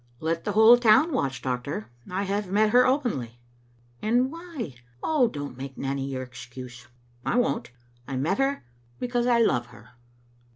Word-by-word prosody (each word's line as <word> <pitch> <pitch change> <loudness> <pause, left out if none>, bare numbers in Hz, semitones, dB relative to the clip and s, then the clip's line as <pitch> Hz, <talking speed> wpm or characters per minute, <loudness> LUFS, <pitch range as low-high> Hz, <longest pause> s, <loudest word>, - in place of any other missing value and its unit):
" - - -33
Let 165 0 -1
the 205 - -1
whole 220 +3 +8
town 245 +8 +5
watch, 135 - -1
doctor. 125 -3 -3 0.2
I 185 +2 -1
have 200 0 -2
met 210 +2 +3
her 250 +2 +6
openly." 215 - -1 0.3
" 120 0 -34
And 245 +5 +2
why? 330 - -7 0.3
Oh, 295 -6 +3
don't 145 - -6
make 135 0 -7
Nanny 135 0 -2
your 130 -1 -4
excuse." 120 -1 -10 0.2
" 120 - -34
I - - 0
won't. 245 -1 0 0.4
I 135 - -3
met 160 - 0
her 270 - 0 0.3
because 245 -1 0
I 240 -1 +4
love 125 - +2
her." 120 -1 -16
180 Hz, 175 wpm, -26 LUFS, -, 0.4 s, whole